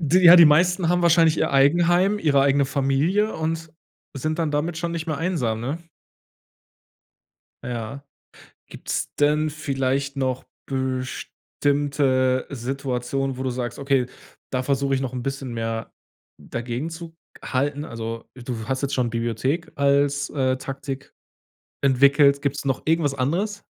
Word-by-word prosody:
Ja, 175 +3 +7
die 170 - +9
meisten 175 +3 +3
haben 175 0 +2
wahrscheinlich 165 -2 +4
ihr - - +1
Eigenheim, 175 +8 +4
ihre 145 -7 +3
eigene 140 0 +3
Familie 140 +11 +1
und 160 0 -3 0.5
sind 155 +5 -2
dann 160 -2 0
damit 155 +3 -1
schon 170 0 -3
nicht 165 0 -4
mehr 155 -3 -2
einsam, 135 -11 -1
ne? 135 +6 -3 1.9
Ja. 120 +3 -5 0.6
Gibt's - - -4
denn 150 +1 +3
vielleicht 140 -2 -2
noch 130 -2 -2 0.2
bestimmte 130 0 -1
Situationen, 135 0 -3
wo 130 - -4
du 130 - -1
sagst: 120 -1 -4
„Okay, 135 -2 +1 0.5
da 130 -1 -1
versuche 140 0 0
ich 130 - -1
noch 130 -1 -3
'n 125 -1 -4
bisschen 135 -2 -4
mehr 115 -1 -4 0.5
dagegenzuhalten“? 145 +2 -4
Also, 115 -3 -6
du 120 -3 -6
hast 130 0 -1
jetzt 140 - -2
schon 125 -2 +1
Bibliothek 120 +8 -2
als, 140 0 +2
äh, 130 -2 0
Taktik 135 +1 -7 0.7
entwickelt. 140 +1 +4
Gibt's 140 -1 -2
noch 135 -1 -1
irgendwas 160 -3 +2
anderes? 180 +11 -1
140 Hz, 130 wpm, -23 LUFS, 130-155 Hz, 1.9 s, die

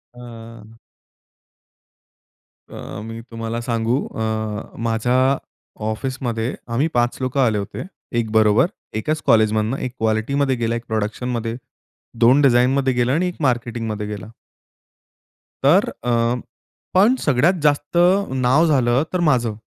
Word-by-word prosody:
अं 115 -2 -11 2.0
अ, 100 - -8
मी 115 +1 -7
तुम्हाला 115 +1 -4
सांगू 115 +1 0
अ, 110 - -7 0.7
माझ्या 125 +4 +2 0.5
ऑफिसमध्ये 120 0 -3 0.2
आम्ही 140 +7 +2
5 120 0 +1
लोकं 130 +2 -1
आले 110 -5 +2
होते, 100 - -5 0.3
एक 115 -2 -1
बरोबर. 110 +2 +4 0.3
एकाच 150 +9 -2
कॉलेजमधनं. 110 +2 +3
1 130 - -4
क्वालिटीमध्ये 130 +5 +1
गेला, 115 -1 -1
1 115 0 -5
प्रोडक्शनमध्ये, 115 +2 -2 0.6
2 125 +5 +5
डिझाइनमध्ये 130 0 +3
गेला 125 +1 +1
आणि 175 +5 +1
1 180 - -5
मार्केटिंगमध्ये 115 -5 -1
गेला. 105 0 -7 1.3
तर - - +5
अ 120 - 0 0.8
पण 205 +7 +5
सगळ्यात 145 +5 +3
जास्त 145 +2 +1 0.4
नाव 130 +7 +4
झालं 130 -3 +2
तर 180 - +1
माझं. 120 -5 +1
120 Hz, 115 wpm, -21 LUFS, 110-135 Hz, 2.0 s, 2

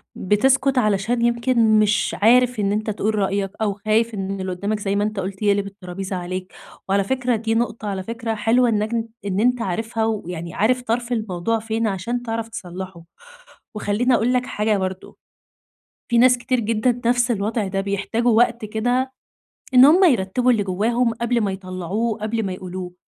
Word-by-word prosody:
بتسكت 265 +7 +2
علشان 215 +1 +1
يمكن 235 -2 +3
مش 210 0 +1
عارف 245 +2 +4
إن 200 -1 +1
أنت 215 +1 -1
تقول 215 +1 -1
رأيك 195 -1 -1
أو 210 -2 +1
خايف 215 +3 0
إن 195 -1 -4
اللي 185 0 -3
قدّامك، 200 +4 -2
زي 200 -1 -1
ما 205 - +1
أنت 210 -1 -2
قلت، 195 +1 -5
يقلب 200 -1 +2
الطرابيزة 190 -1 -6
عليك. 185 +1 -5 0.4
وعلى 200 +1 +2
فكرة 250 +3 0
دي 225 0 -1
نقطة 225 -2 -2
على 195 -2 -3
فكرة 230 +1 -4
حلوة، 235 +3 +3
إنّك 215 0 0 0.3
إن 195 -1 -1
أنت 245 +2 +2
عارفها 225 +3 -2
ويعني 175 -6 -4
عارف 250 +6 +1
طرف 235 +1 -2
الموضوع 220 -1 -1
فين 225 0 -2
عشان 220 +5 -3
تعرف 225 -1 -3
تصلّحه. 185 -4 -8 0.7
وخلّيني 215 +5 +1
أقول 235 +2 +1
لك 250 0 +1
حاجة 210 -3 0
برضو، 190 -1 -5 0.9
في 235 -1 +2
ناس 250 0 +5
كتير 250 +1 0
جدًا 230 +2 0
نفس 245 0 +2
الوضع 215 0 -1
ده، 195 0 -1
بيحتاجوا 200 +4 0
وقت 235 0 +2
كده 245 +5 -1 0.6
إن 255 +1 +9
هم 340 +7 +6
يرتبوا 250 - +2
اللي 220 -4 +1
جواهم 225 +5 0
قبل 235 +1 0
ما 200 -2 0
يطلعوه، 190 +4 -3
قبل 220 +1 -1
ما 190 - -3
يقولوه. 185 -1 -7
215 Hz, 170 wpm, -21 LUFS, 195-235 Hz, 0.9 s, إن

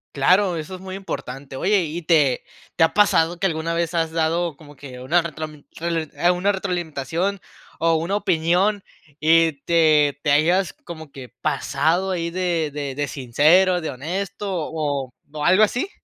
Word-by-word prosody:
Claro, 180 +6 +3
eso 160 +3 -6
es - - -10
muy 190 0 -7
importante. 135 -8 -7
Oye, 195 +4 +2
¿y 165 +2 -5
te 155 -6 +2 0.3
te 165 - +6
ha - - -3
pasado 175 -5 +3
que 195 - +1
alguna 165 -1 -2
vez 170 0 -1
has 165 -1 0
dado 165 0 0
como 145 -1 -16
que 130 -2 -10
una 165 +7 +2
retromin 155 -2 -7
rel 165 -2 -2
e 175 +1 +2
una 185 +3 +1
retroalimentación, 180 0 -2 0.4
o 165 0 +3
una 170 +5 -1
opinión, 185 +2 +1 0.4
y 165 +1 +4
te 155 -4 +3
te 145 - +2
hayas 170 +6 +3
como 160 -4 -11
que 135 -2 -10
pasado 165 +7 0
ahí 170 -2 -2
de 175 -4 -1
de 140 -2 -4
de 145 +1 -2
sincero, 160 +8 +3
de 160 - -4
honesto, 190 +9 -4
o 150 -6 -3 0.2
o 150 -1 -4
algo 185 +6 +5
así? 245 - 0
165 Hz, 170 wpm, -22 LUFS, 150-180 Hz, 0.4 s, te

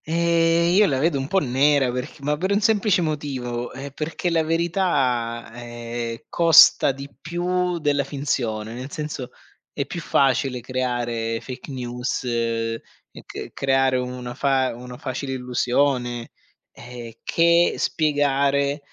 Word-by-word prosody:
Ehm, 170 +1 +2
io 205 +2 +5
la 135 - 0
vedo 145 +1 +1
un 135 - -3
po' 195 - 0
nera, 140 -3 +3
perc 125 +4 -6
ma 150 +1 0
per 185 +6 -2
un 200 - +3
semplice 210 -3 +2
motivo, 130 -6 -3
ehm, 140 +1 -7
perché 160 +5 -3
la 165 -1 +3
verità, 150 - 0
ehm, 120 -1 -6
costa 165 -4 +6
di 135 +1 -8
più 180 +1 -1
della 145 -3 +1
finzione, 120 -6 -3
nel 130 +3 -7
senso 150 -5 -5 0.4
è 140 - -3
più 170 +5 -6
facile 135 -3 +1
creare 120 -2 -2
fake 130 +2 -9
news, 125 -1 -3 0.9
c - - -9
creare 135 -1 +2
una 125 -1 -4
fa 135 -1 +1
una 125 +1 -9
facile 135 +1 -4
illusione, 125 -1 0 0.4
ehm, 120 -1 -10
che 170 +1 +3
spiegare, 140 -2 +1
ehm, 145 - -6
135 Hz, 135 wpm, -23 LUFS, 125-160 Hz, 0.9 s, costa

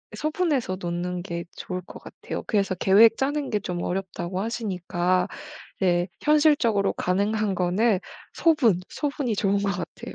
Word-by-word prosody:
소분해서 300 - -1
놓는 175 0 -3
게 170 -2 -4
좋을 180 0 -5
것 180 - -12
같아요. - - -7
그래서 200 -3 0
계획 210 +5 +5
짜는 285 +1 -1
게 210 - 0
좀 175 -2 -4
어렵다고 185 0 -3
하시니까 185 -5 -1 0.6
예 175 -1 +2
현실적으로 290 -10 +3
가능한 200 +2 0
거는 190 +3 +2 0.3
소분, 265 - +3
소분이 280 -6 -2
좋은 200 0 +1
것 200 0 0
같아요. 180 -1 -7
200 Hz, 310 characters per minute, -25 LUFS, 180-230 Hz, 0.6 s, 계획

